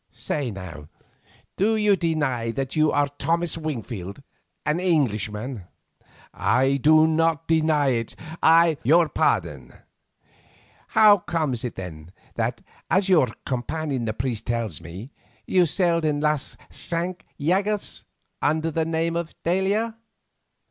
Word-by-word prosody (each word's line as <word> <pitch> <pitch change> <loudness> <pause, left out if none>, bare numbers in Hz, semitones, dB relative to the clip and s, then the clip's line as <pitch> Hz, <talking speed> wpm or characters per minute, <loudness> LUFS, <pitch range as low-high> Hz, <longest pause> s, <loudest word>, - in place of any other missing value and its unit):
Say 140 -4 -3
now, 85 -8 -9 0.7
do 215 +4 +2
you 210 -2 +3
deny 145 -10 -1
that 135 +3 -3
you 155 -1 +3
are 145 0 +2
Thomas 170 +1 0
Wingfield 120 - -5 0.4
and 150 +3 +1
an 185 - -3
Englishman?" 110 - -1 0.7
"I 135 +2 +2
do 155 +3 +5
not 165 0 +1
deny 155 -3 +3
it. 115 -3 -2 0.3
I—" 165 -1 +5
"Your 165 +6 +4
pardon. - - -1 1.2
How 210 -2 +8
comes 155 -9 -2
it 125 - -4
then 85 -3 -8 0.2
that, - - -2 0.3
as 190 +3 +2
your 160 -8 +5 0.2
companion 135 0 -2
the 110 - -2
priest 115 -1 -3
tells 115 -9 -2
me, 95 - -9 0.3
you 180 -2 +3
sailed 170 0 +1
in 150 -2 +1
Las 150 -2 -1
Cinque 175 +1 -3 0.2
Llagas 195 +7 -1 0.4
under 160 +2 +1
the 160 +1 0
name 165 +1 -1
of 170 -1 -4
_d'Aila? 200 +6 0
155 Hz, 130 wpm, -24 LUFS, 120-170 Hz, 1.2 s, How